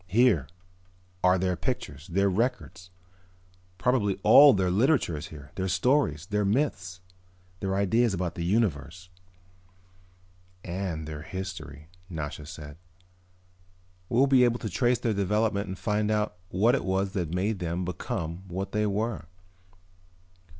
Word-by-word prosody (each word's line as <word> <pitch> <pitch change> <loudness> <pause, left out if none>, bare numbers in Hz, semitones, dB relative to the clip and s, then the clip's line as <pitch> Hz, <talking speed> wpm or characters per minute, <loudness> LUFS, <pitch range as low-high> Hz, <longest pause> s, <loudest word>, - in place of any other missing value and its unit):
"Here 105 - +3 0.8
are 90 0 +5
their 90 0 0
pictures, 70 -3 -4
their 100 +3 +1
records. 100 -3 -2 0.9
Probably 105 -2 +1
all 140 +7 +9
their 95 -5 +1
literature 120 - +2
is 75 - -6
here, 70 -3 -12
their 95 0 -2
stories, 95 - +1
their 105 +2 -1
myths, 95 - -1 0.6
their 95 -1 -2
ideas 110 +4 +2
about 90 -3 -2
the 85 - -5
universe." 90 - -1 1.5
"And 85 -4 -4
their 75 -1 -6
history," 90 -5 -7 0.2
Nasha 75 -3 -6
said. 75 -1 -9 1.3
"We'll 125 +4 +4
be 135 -2 +5
able 120 -1 +3
to 110 - -3
trace 120 +5 +2
their 115 -1 -1
development 100 +1 0
and 95 0 -5
find 105 +3 0
out 105 -3 0
what 110 +7 +3
it 140 - 0
was 95 +1 0
that 90 -5 -2
made 100 +2 -1
them 85 +1 -2
become 85 +1 -5
what 95 +2 -4
they 105 0 +1
were." 105 -4 -2
95 Hz, 135 wpm, -27 LUFS, 85-110 Hz, 1.5 s, all